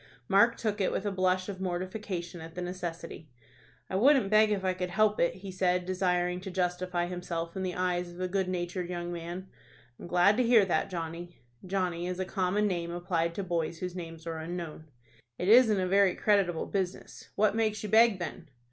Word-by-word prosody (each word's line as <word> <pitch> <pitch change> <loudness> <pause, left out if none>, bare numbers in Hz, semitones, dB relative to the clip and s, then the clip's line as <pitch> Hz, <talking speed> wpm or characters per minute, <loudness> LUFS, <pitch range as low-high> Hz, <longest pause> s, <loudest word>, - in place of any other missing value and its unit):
Mark 230 +5 +4
took 210 -2 -2
it 190 - +1
with 200 - -2
a 205 - 0
blush 185 -1 +1
of 195 -2 -6
mortification 185 -1 -4
at 160 0 -10
the 180 - -4
necessity. 170 -3 -6 0.6
"I - - -4
wouldn't 255 -2 +4
beg 215 0 +6
if 200 -2 -1
I 185 - +2
could 180 0 -3
help 210 +3 +2
it," 170 - +2
he 190 +1 -8
said, 180 -1 +1
desiring 180 -1 0
to 190 - -6
justify 180 -1 -1
himself 175 -2 -4
in 190 - -3
the 185 -1 -2
eyes 180 -1 -1
of 175 - -12
the 185 0 -2
good 190 0 -1
natured 175 0 -3
young 175 -1 -4
man. 175 +2 -6 0.5
"I'm - - -8
glad 180 +4 +4
to 255 - +3
hear 230 -4 +5
that. 180 - 0
Johnny." 170 0 -6 0.3
(Johnny 180 -2 -1
is 180 0 -4
a 185 - -1
common 190 +2 0
name 175 -4 -1
applied 170 -1 -1
to 200 - -3
boys 170 -2 -2
whose 180 +1 -5
names 165 -2 -8
are 165 -1 -4
unknown.) 165 -1 -6 0.5
"It 180 - -1
isn't 225 -3 +6
a 185 - 0
very 195 -1 +4
creditable 195 -6 +2
business. 190 -2 -4
What 215 0 +2
makes 215 -2 0
you 210 - -4
beg, 220 -1 +5
then?" 170 -4 -6
180 Hz, 200 wpm, -29 LUFS, 175-195 Hz, 0.6 s, beg